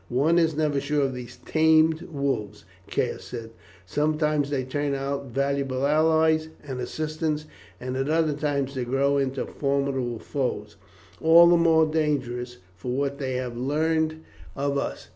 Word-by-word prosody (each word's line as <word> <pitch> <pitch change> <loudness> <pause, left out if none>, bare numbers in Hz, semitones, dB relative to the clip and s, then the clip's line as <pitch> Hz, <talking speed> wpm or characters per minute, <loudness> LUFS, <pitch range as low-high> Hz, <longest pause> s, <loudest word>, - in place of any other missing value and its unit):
"One 150 +8 +3
is 160 -2 +2
never 150 -2 +1
sure 145 +1 0
of 135 - -2
these 125 -2 -8
tamed 160 0 +4
wolves," 135 -8 -3 0.2
Caius - - -1
said; 115 -2 -7 0.3
"sometimes 150 - 0
they 140 -3 -1
turn 140 +2 -2
out 140 0 -3
valuable 140 0 -1
allies 160 +1 +3 0.2
and 130 -3 -5
assistants, 155 +3 -2 0.3
at 130 0 -4
other 160 -1 +2
times 145 -2 -1
they 130 -2 -2
grow 135 +3 +1
into 135 -1 -1
formidable 140 -4 -1
foes, 135 +3 -3 0.5
all 165 +2 +8
the 175 0 +6
more 165 -1 +4
dangerous 130 -6 -1 0.2
for 105 +7 -5
what 140 +1 -1
they 130 -2 -2
have 125 -2 -3
learned 155 +4 0 0.3
of 140 0 -1
us. 140 - -3
140 Hz, 145 wpm, -25 LUFS, 130-155 Hz, 0.5 s, all